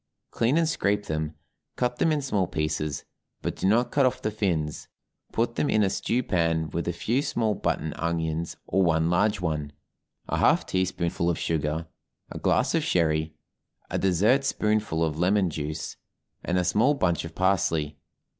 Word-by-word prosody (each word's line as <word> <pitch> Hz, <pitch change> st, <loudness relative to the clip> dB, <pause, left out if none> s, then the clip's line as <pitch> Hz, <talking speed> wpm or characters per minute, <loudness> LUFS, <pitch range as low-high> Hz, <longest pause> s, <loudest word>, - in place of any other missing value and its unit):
Clean 120 Hz, +6 st, +2 dB
and 165 Hz, -1 st, +3 dB
scrape 105 Hz, -9 st, 0 dB
them, 80 Hz, 0 st, -3 dB, 0.4 s
cut 125 Hz, 0 st, -1 dB
them 165 Hz, -, +2 dB
in 150 Hz, -2 st, 0 dB
small 100 Hz, -9 st, 0 dB
pieces, 75 Hz, -3 st, -2 dB, 0.4 s
but -, -, -2 dB
do -, -, -1 dB
not 115 Hz, +5 st, +3 dB
cut 140 Hz, -, +3 dB
off 130 Hz, -, +2 dB
the 110 Hz, -, 0 dB
fins; 85 Hz, -8 st, -2 dB, 0.4 s
put 115 Hz, +1 st, -1 dB
them 145 Hz, -, +1 dB
in 110 Hz, -, +3 dB
a 95 Hz, -, +2 dB
stew 125 Hz, +5 st, 0 dB
pan 80 Hz, -5 st, 0 dB
with 85 Hz, +2 st, -3 dB
a -, -, +2 dB
few 115 Hz, +9 st, 0 dB
small 110 Hz, -6 st, 0 dB
button 80 Hz, -5 st, -2 dB
onions 85 Hz, -1 st, -2 dB
or 95 Hz, -, +1 dB
one 80 Hz, -2 st, +2 dB
large 100 Hz, +2 st, +2 dB
one, 75 Hz, -4 st, -2 dB, 0.6 s
a -, -, -1 dB
half -, -, +3 dB
teaspoonful 90 Hz, -2 st, 0 dB
of 85 Hz, -, 0 dB
sugar, 80 Hz, 0 st, -1 dB, 0.5 s
a -, -, -6 dB
glass -, -, +2 dB
of -, -, +2 dB
sherry, 80 Hz, -2 st, +1 dB, 0.6 s
a -, -, 0 dB
dessert 105 Hz, +9 st, +3 dB
spoonful 105 Hz, -9 st, 0 dB
of 80 Hz, 0 st, -3 dB
lemon 95 Hz, 0 st, +2 dB
juice, 75 Hz, +1 st, -4 dB, 0.5 s
and 90 Hz, -, 0 dB
a 90 Hz, -, +2 dB
small 125 Hz, +11 st, +3 dB
bunch 90 Hz, -10 st, +1 dB
of 80 Hz, -1 st, -8 dB
parsley. 80 Hz, -6 st, +1 dB
90 Hz, 175 wpm, -26 LUFS, 80-110 Hz, 0.6 s, and